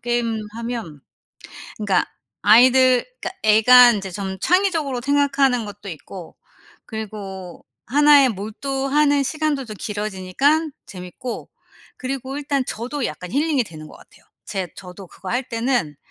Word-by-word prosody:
게임하면 230 - -4 0.8
그러니까 200 -4 +1 0.4
아이들 255 +2 +6 0.2
그니까 380 - -6
애가 240 +3 +7
인제 195 -3 -4
좀 190 0 -5
창의적으로 330 - +1
생각하는 275 -3 +2
것도 205 0 -10
있고 170 +2 -10 0.5
그리고 200 -5 -8 0.2
하나에 290 0 +6
몰두하는 275 +7 0
시간들도 300 -2 -1
좀 215 -1 -8
길어지니깐 210 - 0 0.2
재미있고 185 +7 -8 0.5
그리고 265 +1 -4
일단 285 -2 -1
저도 250 +4 -4
약간 180 - -7
힐링이 285 -1 +1
되는 155 -5 -11
것 - - -14
같아요. - - -21 0.2
제 190 -3 -4
저도 185 0 -10
그거 185 - -11
할 245 +2 0
때는 230 - -1
240 Hz, 305 characters per minute, -21 LUFS, 200-275 Hz, 0.8 s, 애가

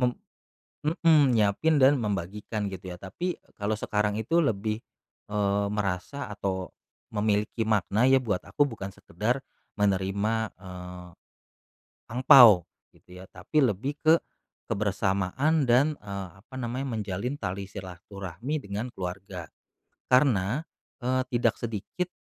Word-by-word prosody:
mem 125 -1 +1 0.7
mhm, 155 -5 +4
nyiapin 110 +9 +3
dan 135 +1 +6
membagikan, 105 +1 -3
gitu 95 0 -7
ya. 90 - -7
Tapi, 175 - -3
eee, - - -30
kalau 105 +1 0
sekarang 105 -1 0
itu 115 +10 +1
lebih, 110 -5 0 0.5
eee, 100 -1 +1
merasa 100 +7 -2
atau 95 -2 -3 0.4
memiliki 105 +2 0
makna 110 +3 +2
ya 135 - +6
buat 100 -6 0
aku, 145 - +1
bukan 100 -6 -6
sekedar 105 +6 -2 0.4
menerima, 100 +2 +1 0.2
eee, 90 -1 -9 1.0
angpao 120 - +8 0.3
gitu 90 0 -15
ya, - - -11
tapi 155 -3 +1
lebih 120 +7 -2
ke 160 +1 +7 0.6
kebersamaan 105 - +1
dan, 140 +6 +4
eee, 100 -2 -6
apa 130 - -16
namanya, 125 +1 -3
menjalin 105 +6 -3
tali 100 0 -3
silaturahmi 100 - -6
dengan 100 +4 -4
keluarga. 90 -1 -6 0.6
Karena, 125 -1 +3 0.4
eee, 130 +1 +1
tidak 115 -2 +2
sedikit, 115 - -3
105 Hz, 120 wpm, -27 LUFS, 95-125 Hz, 1.0 s, angpao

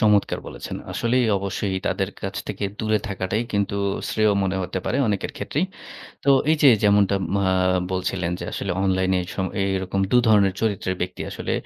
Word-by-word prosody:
চমৎকার 105 -2 +3
বলেছেন। - - -6 0.2
আসলেই, 120 +1 +1
অবশ্যই 100 0 -2
তাদের 95 +1 0
কাছ 95 0 -4
থেকে 105 0 -3
দূরে 110 -1 +1
থাকাটাই 100 +3 -1
কিন্তু 100 -1 0 0.3
শ্রেয় 110 -1 +2
মনে 95 0 0
হতে 90 +1 -3
পারে 130 - 0
অনেকের 100 -2 -1
ক্ষেত্রেই। 150 +6 -1 0.6
তো 140 - +4 0.2
এই 160 - +4
যে, 140 - +9
যেমনটা 100 -1 +4 0.2
মা 100 - +1 0.5
বলছিলেন 90 -1 -1
যে, - - -5
আসলে 100 - -3
অনলাইনে 95 -1 +2 0.2
সম 95 - -1
এ - - +2
এইরকম 95 +1 -1
দুধরনের 110 -6 +4
চরিত্রের 100 -4 -1
ব্যক্তি 90 +1 -3
আসলে। - - -4
100 Hz, 165 wpm, -23 LUFS, 95-110 Hz, 0.6 s, যে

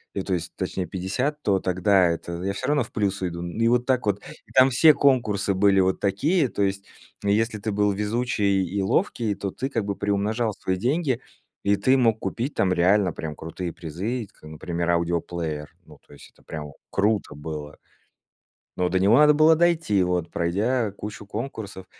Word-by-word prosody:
и 100 - -1
то 95 - -2
есть 85 -1 -3
точнее 95 0 -3
50, 130 +11 -2
то 100 -2 +2
тогда 95 0 +3
это 85 +1 -3
я 100 +1 -1
всё 130 +6 -4
равно 145 -2 +2
в 115 - -13
плюс 100 -3 -1
уйду". 85 -2 -3
Ну 85 +5 -6
и 115 - +4
вот 120 +1 +2
так 130 -3 +1
вот, 105 -1 0 0.3
и - - -20
там 130 0 +6
все 150 +5 +6
конкурсы 115 -9 +2
были 95 0 +4
вот 95 0 +1
такие: 140 - +1
то 110 - -4
есть 100 0 -1 0.4
и 100 - +3
если 110 +1 0
ты 110 +1 -3
был 105 0 +2
везучий 105 -1 0
и 100 +3 -2
ловкий, 110 - 0
то 100 -1 -4
ты 130 - -3
как 115 -5 -1
бы 100 -1 -3
приумножал 105 +3 0
свои 95 -1 -2
деньги. 130 - 0 0.4
И 100 0 +3
ты 130 +7 +3
мог 115 -4 +2
купить 125 +5 -3
там 95 - +1
реально 90 +2 +3
прям 80 -2 -6
крутые 85 +2 -6
призы, 100 +9 -4
как, - - -28
например, 85 +2 -2
аудиоплеер. 85 -3 -2
Ну, - - -16
то - - -16
есть, 70 - -15
это - - -26
прям 75 -2 -7 0.2
круто 105 -2 0
было. 75 0 -7 1.0
Но 90 0 +2
до 95 - +2
него 95 +2 +4
надо 150 0 +7
было 155 +2 +5
дойти, 165 - +2
вот, 90 -2 -1
пройдя 105 +8 0
кучу 105 +1 -8
конкурсов. 105 -4 -6
100 Hz, 195 wpm, -24 LUFS, 90-120 Hz, 1.0 s, надо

